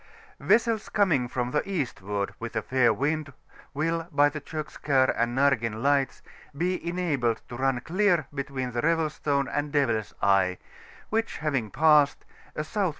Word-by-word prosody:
Vessels 230 -2 +2
coming 160 - +2
from 125 0 -3
the 150 - +1
eastward 105 - -3
with 115 0 -6
a - - -1
fair 130 -2 +3
wind 150 +1 -1 0.4
will, 165 +3 -1
by 145 -1 +4
the 150 +1 -7
Eokskar 145 -3 0
and 120 +2 0
Narseii 120 -6 +2
Lights, 140 +1 +1 0.3
be 180 +3 -1
enabled 145 -11 -1
to 120 - -7
run 130 -1 0
clear 180 +1 +2
between 135 -3 -4
the 120 0 -2
Revel 165 -1 +1
Stone 140 -2 -1
and 145 0 -2
Devil's 115 -8 0
Eye; 95 -2 +3 0.5
which 225 -3 -1
havmg 135 -9 -1
passed, 150 -2 +4 0.3
a - - -1
S.W. 185 +5 -1
140 Hz, 150 wpm, -27 LUFS, 125-160 Hz, 0.5 s, by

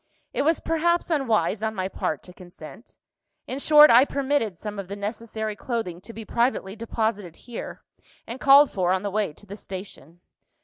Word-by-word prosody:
It - - 0
was 320 +3 +2
perhaps 340 +2 0
unwise 225 - +1
on 220 0 -2
my 185 -1 -2
part 155 -5 -3
to 180 - -14
consent 180 +4 -13 0.5
in 265 - -5
short, 300 0 +7
I 240 +3 +8
permitted 275 -9 -1
some 210 +2 -6
of 195 - -6
the 200 - -6
necessary 215 +1 -5
clothing 205 -6 -4
to 230 - -10
be 225 -1 -9
privately 235 -5 -1
deposited 220 -5 -3
here, 240 -2 -9 0.4
and 235 +3 -7
called 280 +1 +6
for 180 -2 0
on 190 +1 0
the 200 - -3
way 210 -3 -1
to 205 - -18
the 200 0 -9
station. 185 -5 -9
220 Hz, 180 wpm, -24 LUFS, 190-255 Hz, 0.5 s, I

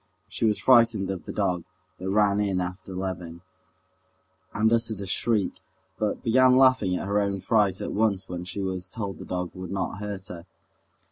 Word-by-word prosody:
She - - -2
was 105 -1 +2
frightened 115 -6 +4
of 95 -4 -6
the - - -5
dog, 90 -2 -1 0.4
that 95 +1 -4
ran 100 0 +3
in 100 -3 0
after 90 +2 -5
Levin, 90 -3 -5 1.1
and 110 +2 +2
uttered 115 -3 0
a 100 - -5
shriek, 105 +2 +1 0.5
but 105 -1 -1
began 130 +2 +5
laughing 130 -8 +4
at - - -3
her 100 +1 +1
own 100 -1 -1
fright 100 -1 +2
at - - -4
once 100 -3 +1
when 90 -1 -5
she 90 +3 -5
was 95 -1 -3
told 100 -2 -5
the - - -8
dog 90 -1 -3
would 95 -1 -7
not 95 0 -3
hurt 100 -2 -5
her. 85 0 -9
100 Hz, 185 wpm, -26 LUFS, 90-110 Hz, 1.1 s, began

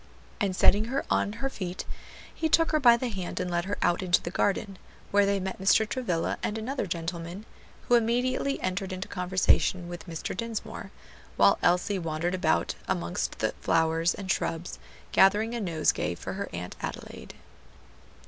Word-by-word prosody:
And 200 -4 0
setting 205 +3 +5
her 265 +4 -2
on 205 - +1
her 235 +5 -2
feet, 185 -8 -5 0.5
he 320 - -1
took 330 +1 +4
her 310 - +3
by 240 -4 +7
the 250 +1 -2
hand 190 -5 -4
and 180 - -2
led 170 0 0
her 200 +1 -2
out 175 - +2
into 180 -1 +3
the 170 - -6
garden, 195 0 0 0.3
where 205 0 +4
they 200 0 +1
met 190 0 -4
Mr. 210 +3 +4
Travilla 200 -10 -1
and 210 - -2
another 225 0 -3
gentleman, 170 +3 -5 0.4
who - - +2
immediately 245 +4 +2
entered 185 +1 -2
into 185 +1 -5
conversation 180 -1 +1
with 175 +1 -8
Mr. 165 0 -4
Dinsmore, 230 +1 -5 0.5
while - - +5
Elsie 180 +3 +2
wandered 165 +1 -2
about 185 - +1
amongst 85 0 -2
the - - 0
flowers 165 +1 +2
and 190 -2 -3
shrubs, 165 +1 -2 0.3
gathering 210 +4 +4
a 235 - -2
nosegay 155 - 0
for - - -6
her 200 +1 -4
Aunt 90 +1 -6
Adelaide. - - -7
190 Hz, 165 wpm, -28 LUFS, 175-220 Hz, 0.5 s, by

